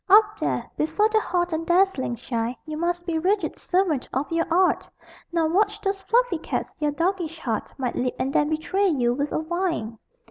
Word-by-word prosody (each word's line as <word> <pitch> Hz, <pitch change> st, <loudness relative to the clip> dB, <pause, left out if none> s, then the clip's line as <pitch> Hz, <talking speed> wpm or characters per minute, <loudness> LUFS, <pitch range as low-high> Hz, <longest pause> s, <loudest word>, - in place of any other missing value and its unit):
Up 420 Hz, +1 st, +6 dB
there, -, -, -1 dB
before 415 Hz, +8 st, +2 dB
the 440 Hz, 0 st, +3 dB
hot 350 Hz, -4 st, -1 dB
and 315 Hz, +1 st, -1 dB
dazzling 345 Hz, -8 st, +2 dB
shine 235 Hz, 0 st, -3 dB
You 310 Hz, -1 st, -5 dB
must 345 Hz, +2 st, -1 dB
be 325 Hz, -2 st, 0 dB
rigid 395 Hz, +5 st, +1 dB
servant 355 Hz, -8 st, 0 dB
of 270 Hz, +5 st, -2 dB
your 330 Hz, 0 st, +1 dB
art, 365 Hz, +2 st, +3 dB, 0.4 s
Nor 330 Hz, -2 st, +1 dB
watch 415 Hz, +4 st, +2 dB
those 390 Hz, -1 st, -2 dB
fluffy 460 Hz, -3 st, +2 dB
cats -, -, -3 dB
your 300 Hz, -1 st, +1 dB
doggish 335 Hz, +2 st, -1 dB
heart 230 Hz, -8 st, -3 dB
Might 255 Hz, -3 st, -2 dB
leap 250 Hz, 0 st, -1 dB
and 270 Hz, +2 st, -1 dB
then 295 Hz, -, +3 dB
betray 370 Hz, +6 st, +1 dB
you 250 Hz, -8 st, +2 dB
with 285 Hz, +3 st, -2 dB
a -, -, 0 dB
whine! 320 Hz, -, -2 dB
335 Hz, 190 wpm, -24 LUFS, 295-385 Hz, 0.4 s, Up